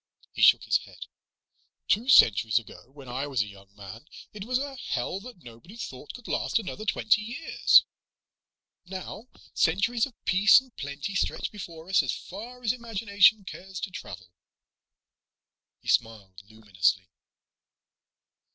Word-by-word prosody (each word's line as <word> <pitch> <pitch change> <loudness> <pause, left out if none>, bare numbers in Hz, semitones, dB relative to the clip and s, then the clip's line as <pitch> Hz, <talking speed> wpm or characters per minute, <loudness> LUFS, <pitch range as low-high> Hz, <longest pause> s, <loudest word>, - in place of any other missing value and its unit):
He - - -5
shook - - +6
his - - +2
head. - - -12 0.8
"Two 235 +5 +1
centuries 110 - +6
ago, 120 +1 -6
when 135 -1 -14
I 130 +4 -4
was 130 -6 0
a - - -10
young 100 0 -15
man, 105 +7 -11 0.3
it 205 -2 -8
was 250 +1 0
a 275 +1 -5
hell 185 - -3
that 215 -4 -13
nobody 120 - -14
thought 135 - -8
could 245 - -12
last - - 0
another 215 0 -5
twenty 215 +1 +2
years. 240 +9 +3 1.0
Now 190 +5 -8 0.3
centuries 200 +9 +1
of 255 - -18
peace 200 +5 +6
and 260 -3 -18
plenty 140 +7 -6
stretch 195 - -2
before 170 -5 -10
us 190 0 +4
as - - -3
far 240 +6 -10
as 220 - +2
the 250 - -6
imagination 220 -2 +2
cares 190 0 -9
to 195 - -4
travel." 90 - -10 1.5
He - - -18
smiled 100 -5 -1
luminously. 95 -4 -1
185 Hz, 145 wpm, -27 LUFS, -, 1.5 s, shook